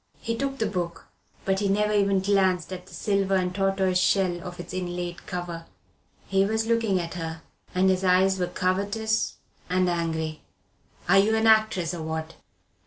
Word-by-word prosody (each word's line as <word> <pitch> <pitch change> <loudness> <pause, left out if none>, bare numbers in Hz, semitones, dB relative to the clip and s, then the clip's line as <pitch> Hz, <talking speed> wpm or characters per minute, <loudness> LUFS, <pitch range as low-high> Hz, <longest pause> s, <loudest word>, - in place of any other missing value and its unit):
He 230 - -2
took 270 +2 -2
the 225 - 0
book, 175 -5 -3 0.4
but 190 0 +1
he 205 - 0
never 210 +2 +2
even 200 -2 +3
glanced 190 -3 +1
at 180 0 -8
the - - -15
silver 195 -2 +1
and 180 -1 0
tortoise 195 -1 +1
shell 180 -2 +2
of 180 0 -8
its 175 - -8
inlaid 175 -1 -4
cover. 175 -2 -5 0.6
He 195 0 +2
was 220 +2 0
looking 225 -4 +2
at 170 -1 -4
her, 165 -2 -5 0.3
and 185 +1 +3
his 190 0 +2
eyes 190 +1 +3
were 180 - 0
covetous 200 +5 0 0.3
and 185 0 +2
angry. 160 -2 -2 0.7
"Are 195 +3 +6
you 215 +3 +3
an 220 0 +1
actress, 215 -6 +3
or 170 - -5
what?" 160 0 -4
185 Hz, 175 wpm, -26 LUFS, 175-200 Hz, 0.7 s, Are